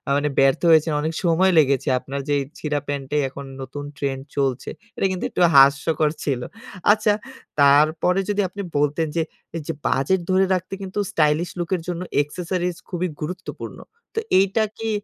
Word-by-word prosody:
মানে 145 +1 +1
ব্যর্থ 135 -1 +4
হয়েছেন, 160 0 +5
অনেক 160 +2 -2
সময় 180 +3 +3
লেগেছে। 140 -2 +3
আপনার 135 +2 -5
যেই 145 -1 +2 0.2
ছিঁড়া 150 -1 -1
প্যান্টেই 145 +1 -1
এখন 140 +1 -9 0.2
নতুন 140 +2 -6
ট্রেন্ড 135 -2 -2 0.2
চলছে। 135 -2 0 0.3
এটা - - +1
কিন্তু 185 - -3
একটু - - -2
হাস্যকর 140 +3 +5
ছিল। 130 -4 -1 0.5
আচ্ছা, 210 0 +3 0.5
তারপরে 155 +6 +4
যদি 205 0 +1
আপনি 200 +2 -6 0.2
বলতেন 150 +3 +1
যে, 165 - +3 0.3
এইযে 165 +1 -4
বাজেট 140 +8 +2
ধরে 190 +1 +4
রাখতে 185 +1 -3
কিন্তু 195 +2 -4
স্টাইলিশ 155 +2 +2
লুকের 175 0 -1
জন্য 175 -1 -3 0.2
accessories 175 +3 -3
খুবই 180 0 -1
গুরুত্বপূর্ণ। 180 +4 -6 0.4
তো - - +1 0.2
এইটা 195 +3 +2
কি 225 0 -3
160 Hz, 155 wpm, -22 LUFS, 140-185 Hz, 0.5 s, হয়েছেন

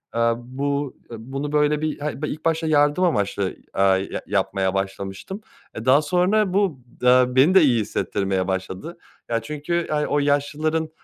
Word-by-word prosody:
eee, 115 0 +3
bu 140 +3 -3 0.2
eee, - - -5
bunu 135 +5 -5
böyle 150 0 +2
bir 155 -1 -2
hayır 145 -1 -4
be 155 - -1
ilk 155 - -6
başta 160 0 +1
yardım 145 +3 +3
amaçlı, 100 - 0 0.3
eee, 95 - +3 0.3
ya - - -4
yapmaya 95 -1 0
başlamıştım, 95 - -4 0.3
eee, 115 +2 -6
daha 135 +3 +5
sonra 180 +5 +1
bu 190 -9 +1 0.2
d 125 0 +4
beni 155 +9 +5
de 190 - +8
iyi 120 -7 +3
hissettirmeye 95 -2 -2
başladı. 95 - -4 0.3
Ya, 115 -1 0
çünkü, 150 +7 -2
yani, 150 -1 0
o 145 - +1
yaşlıların, 150 +3 0
145 Hz, 170 wpm, -22 LUFS, 115-155 Hz, 0.3 s, de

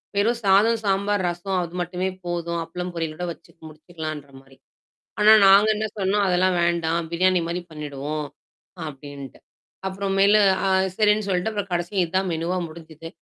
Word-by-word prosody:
வெறும் 230 +4 +1
சாதம், 210 +4 +4
சாம்பார், 200 0 +1
ரசம் 175 +2 -2
அது 175 0 -6
மட்டுமே 180 +2 -2 0.2
போதும். 170 -1 -3
அப்பளம் 180 +2 -6
பொரியில் 165 -2 -3
ஓட 180 - -5
வச்சு - - -14 0.2
முடிச்சுக்கலான்ற 155 -2 -8
மாரி. 135 0 -21 0.6
ஆனா, 210 +1 +7
நாங்க 200 +2 +7
என்ன 215 +1 -2
சொன்னோம், 200 +1 +1
அதெல்லாம் 185 0 +2
வேண்டாம். 170 -1 0
பிரியாணி 185 +1 +2
மாரி 170 +1 -3
பண்ணிடுவோம், 150 0 -5 0.6
அப்டின்ட்டு. 140 -2 -9 0.5
அப்புறம் 195 0 -3
மேல 200 +2 +6 0.3
அ - - +2 0.3
சரின்னு 210 -1 +2
சொல்ட்டு 185 +2 0
அப்புறம் 205 -2 -4
கடைசியா 175 +3 -1
இதான் 190 +3 -1
மெனூவா 165 +3 -2
முடிஞ்சுது. 160 0 -11
180 Hz, 150 wpm, -23 LUFS, 160-195 Hz, 0.6 s, ஆனா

